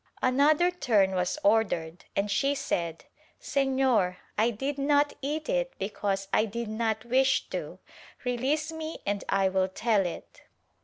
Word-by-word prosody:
Another 295 +7 +4
turn 210 - +2
was 180 +8 0
ordered 180 - +1
and 200 +1 0
she 275 +8 +2
said 170 - -3 0.3
"Senor 260 -9 +1 0.2
I 220 +3 +3
did 270 +5 -3
not 290 +1 +3
eat 300 +3 -3
it - - 0
because 195 0 -2
I 215 - +4
did 230 +1 -5
not 220 0 -1
wish 260 +2 +2
to - - -5 0.2
— - - -22
release 270 +6 0
me 320 0 -5
and 200 -1 -1
I 195 -1 +3
will 190 0 +1
tell 200 0 +1
it." 170 - -9
235 Hz, 150 wpm, -28 LUFS, 195-280 Hz, 0.3 s, Another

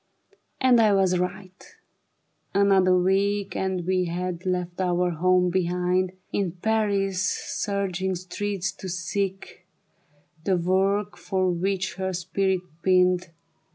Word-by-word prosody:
And 250 -3 +5
I 215 -2 +4
was 185 -2 +2
right; 185 +1 -5 0.9
another 190 -2 +4
week 195 +2 +1
And 190 -2 -2
we 185 0 +1
had 180 +1 -4
left 180 0 -2
our 180 -1 +1
home 180 +2 +2
behind, 180 +1 0 0.2
In 190 -4 0
Paris' 200 -1 0
surging 190 -1 -2
streets 190 +1 -3
to 190 0 -8
seek 185 +1 -4 0.8
The 185 +1 +2
work 195 +4 +1
for 185 -2 0
which 190 +2 -2
her 190 0 -2
spirit 185 +1 0 0.2
pined. 180 -1 +3
185 Hz, 115 wpm, -25 LUFS, 180-195 Hz, 0.9 s, And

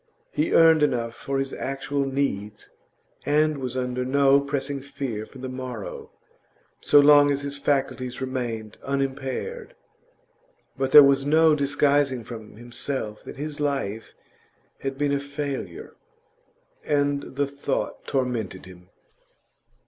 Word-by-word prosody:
He 150 - 0
earned 160 -1 +6
enough 120 -5 +1
for 135 +3 -4
his 135 0 -2
actual 135 +1 -2
needs, 105 -7 -3 0.5
and 150 0 +2
was 130 -1 -4
under 125 0 -2
no 140 +1 +4
pressing 140 0 -3
fear 135 -6 -5
for - - -14
the 130 0 -6
morrow, 130 -4 -7 0.7
so 145 - +5
long 145 0 +7
as 140 0 0
his 140 0 -4
faculties 135 -3 -1
remained 120 -5 -4
unimpaired; 140 - -3 1.0
but 135 0 -1
there 145 +2 +10
was 140 0 +4
no 155 +2 +5
disguising 140 -3 +2
from 110 -2 -10
himself 120 -1 -5
that - - -9
his 150 +1 -5
life 135 -7 -2 0.6
had 135 0 -4
been 145 0 +1
a 140 - +1
failure. 140 - -5 0.9
And 145 -1 +1
the 145 +1 +1
thought 140 0 -4
tormented 120 -8 -2
him. 90 -1 -15
135 Hz, 125 wpm, -25 LUFS, 125-145 Hz, 1.0 s, there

